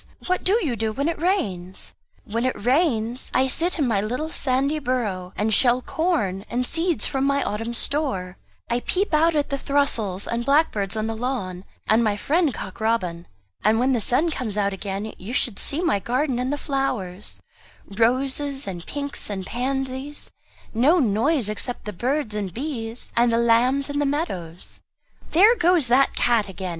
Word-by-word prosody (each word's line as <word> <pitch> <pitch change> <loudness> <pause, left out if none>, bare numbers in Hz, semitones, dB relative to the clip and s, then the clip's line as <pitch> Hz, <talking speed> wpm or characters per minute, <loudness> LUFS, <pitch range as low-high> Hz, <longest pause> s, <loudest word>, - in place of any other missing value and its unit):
What 365 0 0
do 380 - +3
you 255 -5 0
do 220 0 -1
when 280 +7 -1
it 335 - -2
rains?" 195 - -1 0.3
"When 230 0 -2
it 255 -4 -1
rains, 250 -4 +1
I 260 - +4
sit 330 +7 0
in 290 -5 +1
my 210 -4 +1
little 250 +9 -3
sandy 275 +3 +1
burrow 220 -9 -2
and 215 +1 0
shell 245 +2 +4
corn 255 - -1
and 250 +1 -1
seeds 335 +3 0
from 270 -2 -1
my 280 0 +2
Autumn 225 +3 -3
store. 245 -12 -1 0.3
I 235 +1 0
peep 375 +8 -1
out 320 +2 +4
at 290 -1 0
the 275 - -1
throstles 230 -10 0
and 235 0 -1
blackbirds 230 -8 +2
on 215 - -1
the 225 0 -2
lawn, 200 -7 -3 0.2
and 220 +2 +4
my 210 -2 +1
friend 320 - +2
Cock - - -7
Robin. 180 -7 -1 0.4
And 220 +1 +3
when 260 +2 +3
the 240 - +1
sun 300 +10 +2
comes 225 -8 -3
out 200 -1 +1
again, 200 +2 -4
you 205 +7 -6
should 235 -5 +2
see 295 +4 +5
my 335 - +2
garden 255 +4 0
and 255 +2 -1
the 290 - -1
flowers 250 -10 -3 0.5
roses 265 +6 0
and 175 -3 -6
pinks 285 -4 -4
and 190 -2 -4
pansies 265 +4 -3 0.4
no 270 +10 +4
noise 245 - +2
except 225 +4 -3
the 210 - -5
birds 255 - -1
and 205 -3 -3
bees, 240 -4 -5
and 235 0 +4
the 230 - +2
lambs 240 +4 +3
in 285 0 -2
the 290 - +2
meadows." 185 - -3 0.5
"There 405 +8 +7
goes 345 - +3
that 265 +3 +4
cat 225 -4 +2
again!" 190 -1 -5
245 Hz, 180 wpm, -23 LUFS, 210-285 Hz, 0.5 s, There